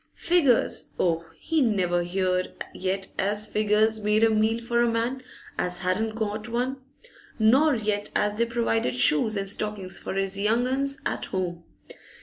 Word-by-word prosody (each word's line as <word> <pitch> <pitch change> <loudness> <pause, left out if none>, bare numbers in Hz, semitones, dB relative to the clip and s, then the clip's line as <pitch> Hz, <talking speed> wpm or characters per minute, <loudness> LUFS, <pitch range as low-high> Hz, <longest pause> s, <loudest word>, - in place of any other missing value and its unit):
Figures, 310 -9 +2
oh? 165 -1 +1
He 320 -2 0
never 185 -7 +1
heered 185 +1 -1 0.2
yet 190 +1 -2
as 210 +2 +1
figures 215 +1 +1
made 210 +1 +2
a 225 - +5
meal 220 +1 +2
for 235 0 0
a 240 - +3
man 235 +3 -1 0.4
as 180 0 -1
hadn't 215 +5 -1
got 215 0 -3
one; 250 +3 -1 0.6
nor 265 +7 +4
yet 210 -2 -1
as 210 0 +2
they 230 +3 +1
provided 230 - 0
shoes 150 - +3
and 195 0 -2
stockings 195 -2 -3
for - - -5
his 195 0 -1
young 225 +4 +2
'uns 275 +2 -1
at - - -3
'ome. 175 -2 -3
215 Hz, 155 wpm, -26 LUFS, 190-235 Hz, 0.6 s, a